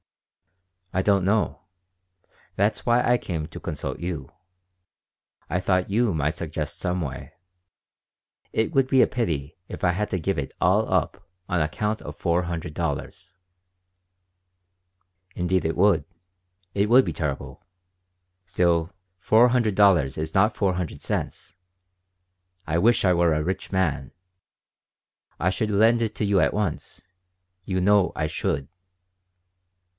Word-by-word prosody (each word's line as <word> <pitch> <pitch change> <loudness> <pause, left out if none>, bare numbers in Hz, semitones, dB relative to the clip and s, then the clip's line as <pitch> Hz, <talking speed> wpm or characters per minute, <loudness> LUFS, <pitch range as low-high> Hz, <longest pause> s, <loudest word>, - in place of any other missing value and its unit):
"I 95 - +1
don't 100 -2 +3
know. 105 +3 0 0.9
That's 100 +3 0
why 120 +1 +3
I 120 0 +4
came 85 -8 -4
to - - -10
consult - - -5
you. 85 -2 -5 1.2
I 90 - -1
thought 90 +1 0
you 115 -1 +2
might 75 0 -1
suggest 80 0 -5
some 90 -1 -1
way. 70 -1 -6 1.2
It 110 +8 0
would 135 -2 +3
be 130 -2 +5
a - - +3
pity 80 - -3
if - - -8
I 90 - +4
had 105 +4 -2
to 95 - -1
give 95 +4 -1
it 70 - -5
all - - +2
up - - -1 0.2
on 90 -2 0
account 105 +8 -2
of - - -9
four 85 0 +1
hundred 85 -3 -5
dollars." 85 +4 -4 2.0
"Indeed 90 +1 0
it 80 - -2
would. 95 -4 +4 0.7
It 100 +1 +1
would 130 +2 +6
be - - -3
terrible. 75 -4 -4 0.8
Still, 85 -1 +1 0.3
four 115 +6 +5
hundred 120 -5 +1
dollars 90 -10 +4
is 80 +1 -4
not 105 +3 +3
four 95 -3 +1
hundred 90 -3 -4
cents. - - -4 1.1
I 85 +1 +1
wish 115 +2 +3
I 90 - +4
were 85 -2 +3
a 75 - 0
rich 95 +3 -4
man. 75 -8 -1 1.3
I 90 - +1
should 105 +3 -2
lend 115 +3 +4
it 110 -1 -2
to 105 - -1
you 100 -2 +3
at 70 - +1
once. 95 -4 -4 0.6
You 95 0 -2
know 100 0 +3
I 80 - -1
should." 70 -3 -2
90 Hz, 140 wpm, -24 LUFS, 80-105 Hz, 2.0 s, would